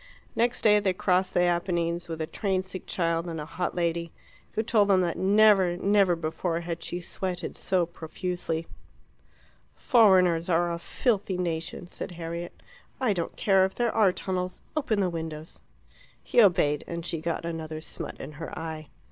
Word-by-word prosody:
Next 240 +1 +1
day 210 -1 +6
they 195 -3 +1
crossed 185 0 +1
the 175 - +4
Apennines 175 -1 0
with 165 -1 -4
a - - -1
train 185 +3 -1
sick 185 0 -8
child 165 -1 0
and 165 -2 -4
a 150 - -5
hot 175 +3 -3
lady, 170 -1 -1 0.4
who 220 - 0
told 215 -3 +3
them 190 -2 +4
that 175 -2 0
never, 195 -3 +4
never 195 -2 +3
before 165 +1 -2
had 170 0 -5
she 175 - -3
sweated 180 +1 -4
so 185 -3 +1
profusely. 165 0 -4 1.1
"Foreigners 185 - +4
are 175 0 +2
a 170 - -4
filthy 200 0 0
nation," 170 0 -3
said 175 - -7
Harriet. 170 0 -6 0.4
"I 250 -6 +2
don't 170 -3 -3
care 195 -2 +4
if 190 0 -1
there 240 -2 0
are 205 -4 +4
tunnels; 185 0 -4
open 240 -9 +1
the 185 - +1
windows." 160 -1 -6 0.6
He 240 - +4
obeyed, 155 -7 +3
and 170 0 -5
she 165 -2 -2
got 165 0 -2
another 160 -2 -4
smut 155 - -7
in - - -7
her 160 +2 -7
eye. 160 -2 -6
175 Hz, 170 wpm, -27 LUFS, 165-190 Hz, 1.1 s, day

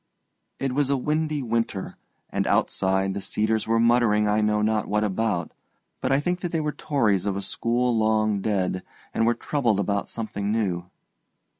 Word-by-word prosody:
It 135 -2 -2
was 140 0 +1
a 140 - +2
windy 150 +1 -1
winter, 115 -4 -2 0.4
and - - 0
outside 95 0 +1
the 100 - -4
cedars 110 +2 0
were 115 0 +2
muttering 115 -3 +4
I 105 +1 +2
know 105 0 +2
not 110 0 +1
what 105 +1 +1
about; 105 -4 -1 0.5
but 130 - 0
I 135 - +4
think 180 +4 -1
that 175 -1 -4
they 165 - 0
were 150 -1 -1
Tories 110 - +1
of 100 -1 0
a - - -2
school 120 +4 0
long 110 -2 +2
dead, 95 -3 0 0.3
and 115 - +2
were 120 - +3
troubled 120 -5 0
about 100 0 -1
something 105 -3 -3
new. 90 -6 -1
110 Hz, 175 wpm, -25 LUFS, 100-125 Hz, 0.5 s, muttering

